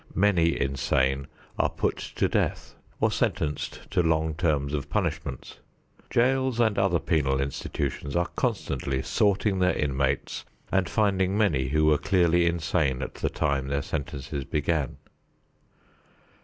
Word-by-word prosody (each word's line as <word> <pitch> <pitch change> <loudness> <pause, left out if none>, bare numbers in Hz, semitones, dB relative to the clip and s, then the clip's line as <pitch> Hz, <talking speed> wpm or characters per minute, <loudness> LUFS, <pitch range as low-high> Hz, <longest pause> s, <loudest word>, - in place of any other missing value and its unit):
Many 85 -5 +3
insane 65 0 0 0.3
are - - +3
put - - -1 0.2
to - - +2
death - - -1 0.3
or - - +2
sentenced 75 -1 -1
to - - +3
long 80 -1 +1
terms 75 -4 0
of 70 -1 -3
punishments. 65 - -3 0.5
Jails 130 0 +2
and 110 -4 +3
other 95 -3 +3
penal 75 -5 +1
institutions 70 +1 -3
are 85 0 0
constantly 65 0 -1
sorting 100 - +1
their 90 0 +3
inmates 70 -1 -1 0.3
and 95 -3 +1
finding 100 -2 +1
many 75 -12 +2
who 75 +3 +2
were 75 -2 +4
clearly 85 -2 +3
insane 80 -5 0
at - - -5
the - - -2
time 70 -1 -1
their 70 0 -1
sentences 70 -1 -4
began. 75 0 -1
75 Hz, 130 wpm, -27 LUFS, 70-90 Hz, 0.5 s, were